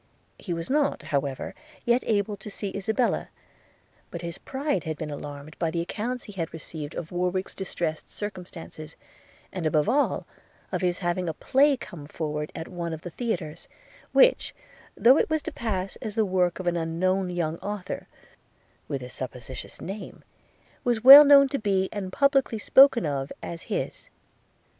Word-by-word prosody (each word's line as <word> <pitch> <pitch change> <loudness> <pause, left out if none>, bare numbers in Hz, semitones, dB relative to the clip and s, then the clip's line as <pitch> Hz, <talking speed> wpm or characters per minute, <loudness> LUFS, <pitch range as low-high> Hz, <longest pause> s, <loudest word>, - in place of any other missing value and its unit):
He 185 - -6
was 165 -1 -3
not, 290 +1 +1
however, 140 -2 -2 0.3
yet 240 +1 +3
able 205 -1 +1
to 200 +1 -10
see 200 -1 -5
Isabella; 220 +5 0 0.8
but 170 0 -7
his 170 -1 -5
pride 285 +2 -2
had 160 -3 -4
been 155 -1 -5
alarmed 145 +1 -8
by 165 - +1
the 170 +1 -2
accounts 235 +8 -4
he 210 - -10
had 165 -4 -3
received 155 -1 -7
of 165 - -6
Warwick's 180 +1 -1
distressed 170 -4 -3
circumstances, 175 -6 -8 0.6
and 175 -4 -1
above 155 -1 +2
all, 285 +4 +1 0.5
of - - -1
his 180 -1 +1
having 175 -1 -1
a 160 - -4
play 275 +1 +3
coming 155 -10 -9
forward 150 -1 -4
at 160 - -5
one 170 -2 -4
of 160 - -6
the 175 - -6
theatres; 175 -8 -4 0.4
which, - - +4 0.4
though 260 +5 +6
it - - +1
was 315 -1 0
to 330 - -4
pass 195 -8 -3
as 215 -2 -6
the 220 -2 +3
work 180 -2 +1
of 185 - -5
an 175 -1 +1
unknown 180 +3 0
young 170 -2 -2
author, 205 -2 -5 0.8
with 135 -3 -3
a - - -6
suppositious 130 0 -7
name, 200 +3 -7 0.6
was 240 -2 0
well 275 +3 +13
known 280 -1 +7
to 275 +1 -2
be, 195 -3 +1
and 195 -3 -4
publickly 275 -2 +2
spoken 265 +1 +6
of 140 -2 -2
as 170 -1 -6
his. - - -3
185 Hz, 165 wpm, -26 LUFS, 160-225 Hz, 0.8 s, well